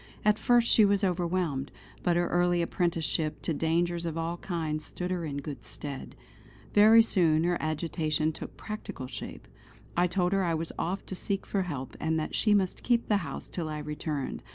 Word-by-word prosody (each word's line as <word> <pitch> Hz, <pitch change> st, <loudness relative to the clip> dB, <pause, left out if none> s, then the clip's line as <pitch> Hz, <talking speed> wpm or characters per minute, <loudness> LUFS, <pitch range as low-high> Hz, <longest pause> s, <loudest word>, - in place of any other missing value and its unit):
At 210 Hz, 0 st, +4 dB
first 240 Hz, -1 st, +4 dB
she 220 Hz, -, +6 dB
was 200 Hz, 0 st, +3 dB
overwhelmed; 175 Hz, -6 st, 0 dB, 0.3 s
but 175 Hz, -, +2 dB
her 175 Hz, 0 st, +2 dB
early 175 Hz, 0 st, +2 dB
apprenticeship 165 Hz, -3 st, -1 dB
to 165 Hz, -, 0 dB
dangers 170 Hz, +2 st, 0 dB
of 165 Hz, -1 st, -3 dB
all 165 Hz, +1 st, -2 dB
kinds 160 Hz, -4 st, -3 dB
stood 180 Hz, +3 st, -4 dB
her 175 Hz, -2 st, -1 dB
in 145 Hz, -2 st, -4 dB
good 140 Hz, 0 st, -6 dB
stead. 140 Hz, -2 st, -7 dB, 0.6 s
Very 220 Hz, +2 st, +8 dB
soon 165 Hz, -7 st, +3 dB
her 175 Hz, +1 st, +2 dB
agitation 155 Hz, 0 st, 0 dB
took -, -, -9 dB
practical 215 Hz, -11 st, -6 dB
shape. 125 Hz, -, -7 dB, 0.5 s
I 175 Hz, +1 st, +3 dB
told 180 Hz, +1 st, +1 dB
her 195 Hz, -1 st, +2 dB
I 170 Hz, -2 st, +1 dB
was 160 Hz, +1 st, -2 dB
off 185 Hz, +4 st, -2 dB
to -, -, -6 dB
seek 195 Hz, +1 st, -2 dB
for 200 Hz, -, 0 dB
help, 145 Hz, -8 st, -5 dB
and 160 Hz, 0 st, 0 dB
that 155 Hz, -, -4 dB
she 210 Hz, -2 st, +3 dB
must 190 Hz, -3 st, 0 dB
keep 240 Hz, -1 st, +1 dB
the 210 Hz, -, +4 dB
house -, -, -5 dB
till 165 Hz, -3 st, -4 dB
I 155 Hz, -, -3 dB
returned. 150 Hz, -1 st, -3 dB
170 Hz, 190 wpm, -29 LUFS, 155-190 Hz, 0.6 s, Very